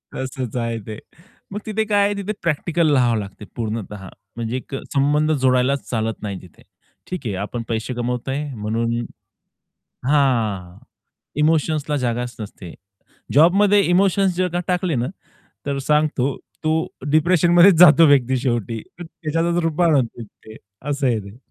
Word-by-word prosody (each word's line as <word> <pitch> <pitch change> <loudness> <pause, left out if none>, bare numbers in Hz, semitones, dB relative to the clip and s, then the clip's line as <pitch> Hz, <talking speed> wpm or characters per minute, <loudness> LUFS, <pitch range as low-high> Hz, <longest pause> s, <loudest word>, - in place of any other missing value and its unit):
तसंच 130 -2 -4
आहे 115 -1 -2
ते. 110 0 -6 0.5
मग 210 - -3
तिथे 220 0 -1
काय 205 -1 +2
आहे 205 - +1
तिथे 200 +1 -3
प्रॅक्टिकल 165 0 +1
राहावं 120 -3 +3
लागते 100 0 -8
पूर्णतः 105 -3 -5 0.3
म्हणजे 115 +1 -3
एक 135 +1 -7 0.2
संबंध 150 +3 +2
जोडायलाच 130 +1 +2
चालत 110 -2 -2
नाही 100 -2 -4
तिथे. 90 - -18 0.5
ठीक 180 -7 -6
आहे 100 -4 -2
आपण 115 +1 -5
पैसे 115 +2 -2
कमवतोय 125 +3 -2
म्हणून 115 +2 -2 1.2
हां, 110 -11 +1 0.6
इमोशन्सला 155 -1 +1
जागाच 120 0 -2
नसते. 100 -4 -8 0.6
जॉबमध्ये 195 +7 +5
इमोशन्स 190 +1 +3
जर 185 0 +1
का 175 - 0
टाकले 180 -4 0
ना 120 - 0 0.6
तर 140 -1 -2
सांगतो 145 -2 +1 0.3
तो 155 - +1 0.4
डिप्रेशनमध्येच 175 +3 +5
जातो 165 -1 +8
व्यक्ती 130 -2 +3
शेवटी 120 -3 -2 0.2
त्याच्यातच 165 0 -2
रूप 165 +1 -1
असं 125 - -2
आहे 115 -3 +1
ते. 100 +2 -11
135 Hz, 130 wpm, -21 LUFS, 115-165 Hz, 1.2 s, जातो